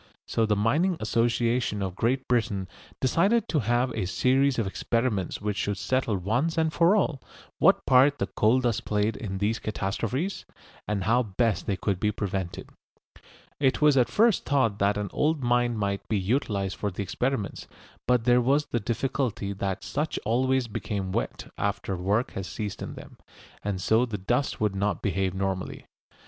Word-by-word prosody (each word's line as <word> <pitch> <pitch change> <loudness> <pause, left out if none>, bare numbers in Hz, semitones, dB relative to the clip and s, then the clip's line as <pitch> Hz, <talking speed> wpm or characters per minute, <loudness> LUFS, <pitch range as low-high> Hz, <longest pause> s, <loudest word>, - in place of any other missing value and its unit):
So 115 -1 +1
the 105 - +2
Mining 155 - +2
Association 115 -1 +1
of 95 -2 -3
Great 130 +6 0
Britain 110 -6 0 0.3
decided 200 - +2
to 155 - +2
have 120 +2 +1
a 105 -6 -2
series 130 +7 +2
of 115 - +1
experiments 105 -1 -1
which 105 -1 -2
should 100 -1 -1
settle 125 -1 0
once 120 - 0
and 160 -1 +1
for 170 +4 +4
all 160 -10 0 0.4
what - - +4
part 135 +3 +5
the - - 0
coal 115 +5 +2
dust 120 -2 0
played 105 +1 0
in 95 -3 -5
these 105 +3 0
catastrophes, 115 - -2 0.4
and 105 -2 -1
how 115 +5 +3
best 110 0 -1
they 100 - 0
could 95 -2 -1
be 105 +1 +1
prevented. 95 -4 -4 0.9
It 135 -2 +2
was 150 -2 +5
at 125 -3 +3
first 225 -1 +3
thought 130 -8 +1
that 100 +1 +2
an 105 -2 -3
old 150 -2 +1
mine 120 -1 +2
might 100 -1 -2
be 110 - +1
utilised 100 -2 -1
for 105 - -1
the 100 +2 -4
experiments, 115 +2 -2 0.4
but 125 -2 +3
there 125 +1 +4
was 140 +4 +2
the 120 - -1
difficulty 115 -2 -2
that 95 -1 -3
such 150 +2 -2
always 130 +3 +1
become 100 -3 -4
wet - - -3
after 100 -1 -1
work 100 +7 0
has 95 -1 -5
ceased 105 -2 -5
in - - -6
them, - - -12 0.5
and 100 -2 -2
so 110 +6 +2
the 110 -3 -4
dust 120 +8 -1
would 105 -2 +1
not 100 -1 -1
behave 95 -2 0
normally. 95 -1 -3
115 Hz, 175 wpm, -27 LUFS, 100-130 Hz, 0.9 s, part